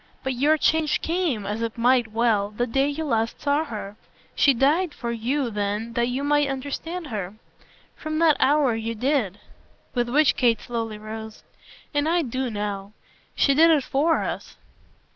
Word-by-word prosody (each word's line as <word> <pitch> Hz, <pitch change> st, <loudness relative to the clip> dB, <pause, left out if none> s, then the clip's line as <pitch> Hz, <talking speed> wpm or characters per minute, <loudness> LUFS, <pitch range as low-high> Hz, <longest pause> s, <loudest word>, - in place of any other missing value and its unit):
But 265 Hz, 0 st, -1 dB
your 290 Hz, +5 st, +3 dB
change 315 Hz, 0 st, +2 dB
came 325 Hz, -, -1 dB
as 210 Hz, +3 st, -3 dB
it 230 Hz, 0 st, -3 dB
might 245 Hz, 0 st, +3 dB
well 220 Hz, -3 st, +1 dB
the 215 Hz, +4 st, -2 dB
day 270 Hz, +3 st, +1 dB
you 300 Hz, +2 st, -3 dB
last 230 Hz, -4 st, -1 dB
saw 290 Hz, +2 st, +1 dB
her; 210 Hz, -5 st, -7 dB, 0.4 s
she 280 Hz, -, +4 dB
died 295 Hz, +7 st, +2 dB
for 235 Hz, -1 st, -4 dB
you 240 Hz, +3 st, -1 dB
then 210 Hz, +2 st, -2 dB
that 235 Hz, 0 st, +1 dB
you 255 Hz, +3 st, -2 dB
might 290 Hz, 0 st, +2 dB
understand 285 Hz, +6 st, -4 dB
her. 200 Hz, -3 st, -4 dB, 0.6 s
From 310 Hz, 0 st, -4 dB
that 320 Hz, -2 st, +5 dB
hour 285 Hz, -3 st, +3 dB
you 225 Hz, +1 st, -3 dB
DID." 235 Hz, -5 st, 0 dB, 0.5 s
With 240 Hz, -1 st, 0 dB
which 295 Hz, +4 st, +4 dB
Kate 235 Hz, -4 st, +2 dB
slowly 225 Hz, -3 st, -4 dB
rose. 220 Hz, +1 st, -8 dB, 0.5 s
"And 290 Hz, +2 st, +1 dB
I 345 Hz, 0 st, +2 dB
do 255 Hz, 0 st, -2 dB
now. 205 Hz, -2 st, -4 dB, 0.4 s
She 275 Hz, -, +3 dB
did 325 Hz, +4 st, +6 dB
it 305 Hz, -4 st, +4 dB
FOR 310 Hz, +6 st, +1 dB
us." -, -, -5 dB
250 Hz, 170 wpm, -24 LUFS, 225-290 Hz, 0.6 s, did